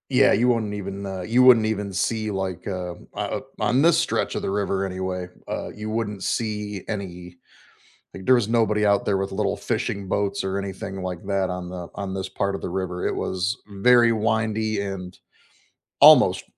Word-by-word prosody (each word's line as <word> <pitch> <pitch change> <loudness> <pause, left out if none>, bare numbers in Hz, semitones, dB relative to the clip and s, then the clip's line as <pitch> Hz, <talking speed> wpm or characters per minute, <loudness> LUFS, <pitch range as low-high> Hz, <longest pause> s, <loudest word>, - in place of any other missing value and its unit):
Yeah, - - +5
you 125 +2 +3
wouldn't 110 -4 0
even, 100 -1 -5
uh 95 -1 -5
you 115 +7 +2
wouldn't 120 -4 +7
even 105 -2 -2
see, 110 +3 -1
like, 95 -3 -4
uh 90 -3 -4
o - - -17
o 100 0 -2 0.2
on 125 +3 +2
this 170 +2 +5
stretch - - 0
of - - -2
the - - -2
river 100 -1 0
anyway, 95 -1 -4 0.2
uh, - - -4
you 105 +1 -7
wouldn't 105 -3 -3
see 105 -3 -2
any 90 -4 -6 0.8
like, 95 - -9
there 130 - +6
was 120 -4 +1
nobody 110 -2 +2
out 100 -1 +3
there 100 - +1
with 95 0 -3
little 105 +1 -1
fishing 110 -4 -2
boats 100 +1 -1
or 95 0 -2
anything 95 0 -5
like 90 -2 -4
that 100 -1 0
on 90 -1 -5
the 90 -1 -6
on 100 -2 -4
this 95 0 -4
part 100 +1 -1
of - - -6
the - - -4
river, 90 -1 -3
it - - -2
was 95 +3 -2 0.2
very 120 0 +6
windy 110 -1 0
and 95 -2 -6 0.8
almost - - +7
100 Hz, 190 wpm, -24 LUFS, 95-110 Hz, 0.8 s, wouldn't